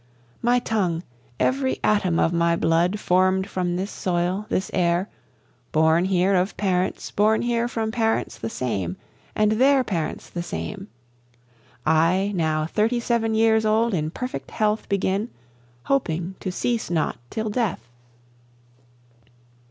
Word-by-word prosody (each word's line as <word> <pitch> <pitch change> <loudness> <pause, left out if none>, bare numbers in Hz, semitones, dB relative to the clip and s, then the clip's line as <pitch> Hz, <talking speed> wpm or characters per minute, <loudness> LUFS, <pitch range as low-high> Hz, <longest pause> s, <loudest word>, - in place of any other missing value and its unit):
My 240 +1 +3
tongue, 190 -8 -1 0.4
every 265 0 +1
atom 190 -5 +2
of 165 - +2
my 170 0 +2
blood, 170 +5 +1
form'd 185 0 +2
from 180 -3 -2
this 190 +3 -3
soil, 180 +3 -1
this 190 - -1
air, 175 +2 +1 0.6
Born 160 +3 +3
here 190 +1 +2
of 185 +1 +1
parents 185 -2 -1
born 215 +2 +2
here 235 0 +1
from 225 -2 -2
parents 225 -1 -1
the 115 - -3
same, 95 -8 -3 0.4
and 215 0 +3
their 265 +4 +4
parents 170 -9 -3
the 175 - -5
same, 195 +3 -5 1.0
I, 165 +6 +3
now 155 -3 0
thirty 220 +8 +1
seven 230 -2 0
years 220 0 +4
old 220 +1 +2
in 155 -3 0
perfect 250 +9 -5
health 215 0 -1
begin, 200 +3 0 0.5
Hoping 180 -9 -1
to 185 - -3
cease 235 +5 -1
not 165 -3 -1
till 220 -1 -3
death. 205 - -2
190 Hz, 135 wpm, -24 LUFS, 170-220 Hz, 1.0 s, their